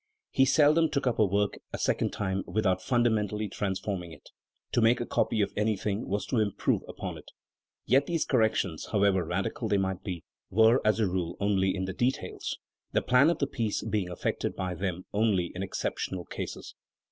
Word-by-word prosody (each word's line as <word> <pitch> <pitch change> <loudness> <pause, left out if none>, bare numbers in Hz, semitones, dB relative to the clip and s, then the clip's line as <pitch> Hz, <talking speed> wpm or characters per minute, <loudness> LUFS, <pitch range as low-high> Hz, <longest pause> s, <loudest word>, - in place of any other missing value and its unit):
He 135 - +4
seldom 150 +4 +4
took 140 - -1
up 125 -3 0
a 110 - +6
work 100 +2 0
a - - -4
second - - +1
time 95 -1 -2
without 95 -4 +1
funda 120 -2 +2
mentally 105 0 -1
transforming 95 -3 -3
it; - - -14 0.4
to 120 - +2
make 115 +2 +4
a 120 - -2
copy 110 - +1
of 100 - 0
anything 105 0 -1
was 100 +2 -1
to 120 - 0
improve 105 -3 +1
upon - - -6
it. - - -14 0.6
Yet 135 +3 +3
these 165 -2 0
corrections, 110 - +1
however 100 -3 +3
radical - - -2
they 100 - +2
might 95 -1 -1
be, 90 -4 -5 0.3
were 110 +5 +5
as 110 +1 +2
a 110 - +3
rule 90 -2 -2
only 95 -2 +2
in 95 -1 -2
the 95 - -4
details, 125 +6 -2 0.4
the - - +2
plan 125 +5 +5
of 170 - +1
the 140 - +1
piece 115 -6 -2
being 100 -4 -1
affected 90 - -2
by 95 -1 -2
them 90 0 -3
only 100 -5 +1
in 95 - -5
exceptional 95 -1 -3
cases. - - -6
105 Hz, 190 wpm, -29 LUFS, 95-115 Hz, 0.6 s, a